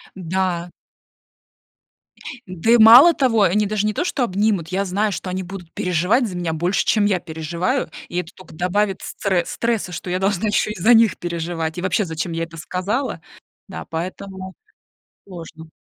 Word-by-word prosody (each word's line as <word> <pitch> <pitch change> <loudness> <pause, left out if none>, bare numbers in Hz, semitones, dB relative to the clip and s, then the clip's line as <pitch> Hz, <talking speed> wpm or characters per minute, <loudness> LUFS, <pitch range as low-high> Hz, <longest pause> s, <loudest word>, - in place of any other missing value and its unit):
Да. 180 -1 -2 1.8
Да 185 +5 -1
и 240 - +7
мало 240 +9 +9
того, 240 -8 +2
они 205 +3 +2
даже 210 0 -1
не 215 - 0
то - - -1
что 280 -7 -1
обнимут, 200 -4 0
я 190 +3 -1
знаю, 200 +2 -1
что 185 - -5
они 185 +1 -3
будут 180 -2 -9
переживать 180 +8 +1
за 185 - -7
меня 175 -2 -2
больше, 175 +4 0
чем 210 -2 +2
я 195 -3 +1
переживаю, 160 +3 -2 0.2
и 175 - -5
это 180 -2 -4
только 185 - -15
добавит 190 +4 0
стре 185 -4 -1
стресса, 230 -6 -2
что 175 +3 -6
я 180 +1 -1
должна 195 +1 0
ещё 210 +1 +1
и 210 - -7
за 225 +8 +5
них 225 -4 +4
переживать, 170 -1 -4
и 175 - -3
вообще, 185 +3 +1
зачем 165 -1 -4
я 165 - -2
это 165 0 -9
сказала. 200 - -3 0.5
Да, - - -7
поэтому 185 +3 -6 0.7
сложно. 165 -3 -10
185 Hz, 175 wpm, -21 LUFS, 170-210 Hz, 1.8 s, мало